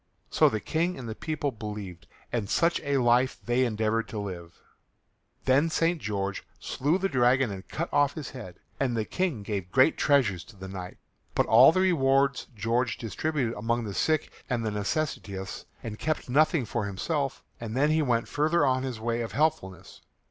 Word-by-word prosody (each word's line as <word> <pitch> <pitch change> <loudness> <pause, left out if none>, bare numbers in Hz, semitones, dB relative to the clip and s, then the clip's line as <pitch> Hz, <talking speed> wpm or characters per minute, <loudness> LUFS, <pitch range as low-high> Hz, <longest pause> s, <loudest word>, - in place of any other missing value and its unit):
So - - +5
the 110 - -2
King 170 - -1
and 125 - -7
the 110 - -4
people 150 +3 -3
believed 105 -8 -7 0.3
and 110 -5 -1
such 170 0 +2
a 140 -1 0
life 125 +1 +3
they 120 +2 +2
endeavoured 115 -1 0
to 110 - -7
live. 90 -5 -6 0.9
Then 135 +5 +4
St. 165 0 +1
George 100 -2 -3 0.2
slew 150 +7 0
the 195 0 0
dragon 130 - +3
and 95 -1 -8
cut 170 +2 -3
off 145 -1 +3
his 150 -5 -6
head, 110 -9 -9 0.2
and 125 -4 0
the 110 - 0
King 170 - -2
gave 100 -3 -4
great 130 +7 +4
treasure 130 - +3
to 110 +6 -12
the 95 0 -9
knight. 90 -1 -7 0.4
But - - +3
all 120 +6 +8
the 185 - +1
rewards 135 -8 +2
George 115 +4 0
distributed 125 +1 -2
among 115 +3 -1
the 105 -3 -5
sick 155 +8 0 0.2
and 120 -3 0
necessitous 105 - -3 0.2
and 110 -2 -6
kept 155 0 -2
nothing 150 +1 +3
for 110 -1 -2
himself, 135 - -2 0.2
and 115 +1 -5
then 145 +3 +3
he 155 0 +3
went 120 -5 +1
further 155 +1 +2
on 130 -1 +2
his 130 -4 -4
way 115 +1 -1
of 115 - -5
helpfulness. 115 - -1
120 Hz, 180 wpm, -28 LUFS, 105-145 Hz, 0.9 s, all